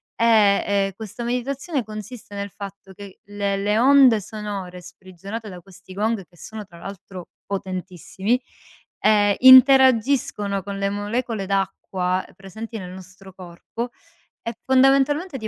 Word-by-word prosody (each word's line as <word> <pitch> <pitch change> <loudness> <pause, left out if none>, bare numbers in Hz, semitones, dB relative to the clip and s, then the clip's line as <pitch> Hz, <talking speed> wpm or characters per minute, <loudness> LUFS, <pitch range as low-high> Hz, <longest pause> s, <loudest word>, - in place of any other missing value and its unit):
ehm, 215 -4 +4
e 195 -1 0
questa 220 +2 -8
meditazione 260 +4 -2
consiste 215 0 -9
nel 200 0 -5
fatto 195 -1 -10
che 200 0 -12
le 200 -1 -2
le 205 +2 0
onde 255 -4 +6
sonore 200 -3 -7
sprigionate 190 +5 -9
da 180 -2 -9
questi 185 0 -15
gong, 215 +1 -1
che 175 - -25
sono 215 +4 -9
tra 175 -3 -16
l'altro 190 -1 -10 0.2
potentissimi, 190 +3 -3 0.6
ehm, 205 -1 +3
interagiscono 260 -5 +5
con 200 +1 -6
le 200 0 -1
molecole 210 +1 -3
d'acqua 185 -1 -2
presenti 220 +4 -8
nel 180 -3 -8
nostro 190 +1 -13
corpo 185 +6 -7 0.5
e 230 0 -5
fondamentalmente 270 +5 +3
ti 220 -3 -5
205 Hz, 130 wpm, -22 LUFS, 195-230 Hz, 0.6 s, onde